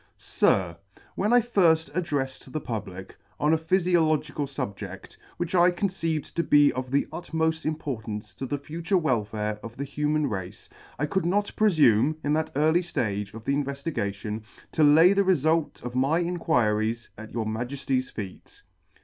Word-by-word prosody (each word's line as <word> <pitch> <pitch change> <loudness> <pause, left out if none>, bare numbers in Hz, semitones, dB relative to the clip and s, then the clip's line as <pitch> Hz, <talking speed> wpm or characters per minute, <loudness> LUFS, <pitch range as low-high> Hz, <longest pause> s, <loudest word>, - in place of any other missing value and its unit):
SIR, 85 -3 +1 0.4
WHEN 210 +3 0
I 245 0 +6
firft 170 -8 +2
addreffed 145 -6 -3
the 155 - -2
Public 95 -7 -6 0.2
on 150 +2 +3
a - - +4
Phyfiological 160 -4 +1
fubje6f, 100 -8 -6 0.2
which 175 0 -3
I 175 -1 +6
con 180 +3 -1
ceived 165 -5 -3
to 170 - +1
be 145 -3 +5
of 130 0 -4
the 140 +2 +2
utmoft 160 -2 -1
importance 110 -9 -4
to 135 - -6
the 145 - -2
future 165 +6 -1
welfare 105 - -1
of 115 0 -9
the 140 - -3
human 150 +1 0
race, 95 -3 -6 0.3
I 145 - 0
could 170 +3 -1
not 205 +3 +1
prelume, 155 - +4
in 145 - +1
that 160 +1 0
early 160 +4 +3
flage 105 - -3
of 115 0 -10
the 140 - +1
invefligation, 135 -8 -3
to - - -19
[ - - -27
Vi - - -23
] - - -42
to 155 - +2
lay 165 +5 +7
the 200 - +3
refult 165 -3 +1
of 125 0 -5
my 135 +5 +2
Inquiries 120 -10 0
at 110 +1 -10
your 115 -1 -2
Maj 120 +5 -3
city's 130 -2 -1
feet. 95 -4 -9
145 Hz, 175 wpm, -26 LUFS, 110-165 Hz, 0.4 s, lay